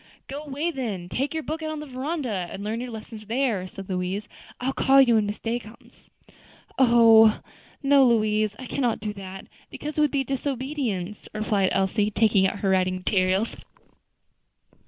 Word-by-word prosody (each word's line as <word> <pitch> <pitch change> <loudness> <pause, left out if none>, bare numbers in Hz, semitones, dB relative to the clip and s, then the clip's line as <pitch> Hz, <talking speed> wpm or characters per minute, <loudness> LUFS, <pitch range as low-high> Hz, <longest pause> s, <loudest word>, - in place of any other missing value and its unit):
"Go 280 +2 -6
away 300 +3 -3
then; 215 - -4
take 275 +7 -1
your 315 - -2
book 315 +2 -4
out 315 - -3
on 310 -1 -4
the 300 - -6
veranda, 260 - -3
and 200 - -7
learn 220 +3 -3
your 250 - -5
lessons 220 -1 -9
there," 230 -6 0
said 195 0 -10
Louise. 185 +2 -3 0.3
"I'll 265 +2 -1
call 270 +1 +4
you 255 -3 +6
when 215 -2 +3
Miss 205 - -4
Day 235 +1 -2
comes." 220 0 -17 0.7
"Oh! 230 -3 +6 0.4
no, 275 0 +5
Louise, 215 -2 +2
I 260 - -8
cannot 245 -2 -1
do 210 0 -4
that, 195 -1 -9 0.2
because 300 +1 -5
it - - +4
would 300 - +4
be 275 -1 0
disobedience," 260 -7 -3
replied 210 -3 +1
Elsie, 200 +2 +1
taking 210 -2 +3
out 200 - -5
her 195 - +1
writing 185 -1 +2
materials. 185 +3 0
225 Hz, 175 wpm, -25 LUFS, 200-270 Hz, 0.7 s, you